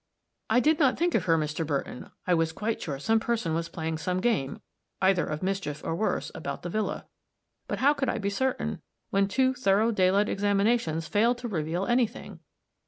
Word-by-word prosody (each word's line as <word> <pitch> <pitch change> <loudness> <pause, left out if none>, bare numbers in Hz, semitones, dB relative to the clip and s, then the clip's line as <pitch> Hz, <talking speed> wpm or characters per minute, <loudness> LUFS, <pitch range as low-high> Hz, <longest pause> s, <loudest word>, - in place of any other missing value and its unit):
"I 225 +3 +4
did 305 +4 +3
not 270 -5 +3
think 345 +1 +1
of - - +1
her, 165 -2 +4
Mr. 155 +1 -1
Burton; 140 -4 -3 0.2
I 180 - +2
was 165 -1 +2
quite 220 +6 -2
sure 140 -4 -3
some 225 +10 +2
person 220 -8 -1
was 165 +1 -2
playing 160 -1 -3
some 185 +1 -1
game, 190 - 0 0.4
either 190 -2 +3
of 150 +3 -4
mischief 185 -6 -2
or - - -2
worse, 215 +5 -1
about - - -5
the 175 - -4
villa; 215 +2 -2 0.6
but - - -2
how 285 +3 +4
could 270 -3 -1
I - - -1
be 200 0 -1
certain, 260 +5 -1 0.3
when 195 0 +3
two 260 +5 +2
thorough 225 -2 +2
daylight 195 0 +3
examinations 200 -4 +1
failed 230 +4 +2
to 245 0 -5
reveal 170 -1 -2
any 240 +1 +3
thing? 225 - -11
195 Hz, 195 wpm, -27 LUFS, 165-235 Hz, 0.6 s, I